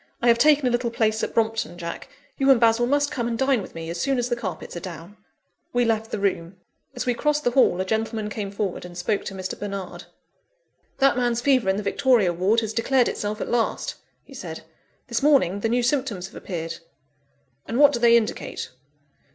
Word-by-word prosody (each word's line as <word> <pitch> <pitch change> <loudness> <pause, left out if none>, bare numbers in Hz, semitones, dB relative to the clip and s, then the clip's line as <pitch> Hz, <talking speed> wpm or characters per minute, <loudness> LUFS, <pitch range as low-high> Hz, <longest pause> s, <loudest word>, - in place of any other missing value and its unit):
I 240 - +2
have 235 0 +4
taken 295 -2 +5
a 250 - +2
little 240 0 0
place 220 -2 0
at - - -3
Brompton, 225 -4 0
Jack, 170 -1 -6 0.3
you 270 0 +3
and 265 -3 +7
Basil 230 +1 +3
must 285 +2 +1
come 240 -2 -2
and 230 -1 -2
dine 265 -3 +2
with 185 - -11
me, 165 0 -6
as 170 0 -4
soon 275 -1 +1
as 245 0 -1
the 240 - +1
carpets 200 -8 -6
are - - -3
down." 170 +2 -9 0.6
We 245 0 +2
left 225 -1 0
the - - -3
room. 190 -3 -1 0.4
As - - -3
we 250 - +2
crossed 300 +4 0
the 245 - +2
hall, 245 -8 +3
a 185 - 0
gentleman 220 +1 -2
came 210 -1 -4
forward, 200 -2 -3
and 175 -1 -10
spoke 200 +4 -1
to 195 - -6
Mr. 185 -1 -5
Bernard. 200 -3 -6 0.9
"That 275 -2 +3
man's 240 -2 +1
fever 255 -7 +3
in 190 - +1
the 210 - -3
Victoria 205 -3 +2
Ward 195 +7 +2
has 220 -1 -4
declared 245 +2 +2
itself 210 +1 -4
at - - -3
last," 235 -1 0 0.3
he - - -16
said. - - -7 0.4
"This 235 -3 -2
morning 270 - +3
the 225 - -1
new 245 +1 +1
symptoms 240 -8 -1
have 195 - -12
appeared." 165 -3 -5 0.9
"And 230 - -2
what 290 +1 +7
do 240 - -1
they 235 0 +6
indicate?" 220 -2 -3
225 Hz, 215 wpm, -24 LUFS, 195-245 Hz, 0.9 s, and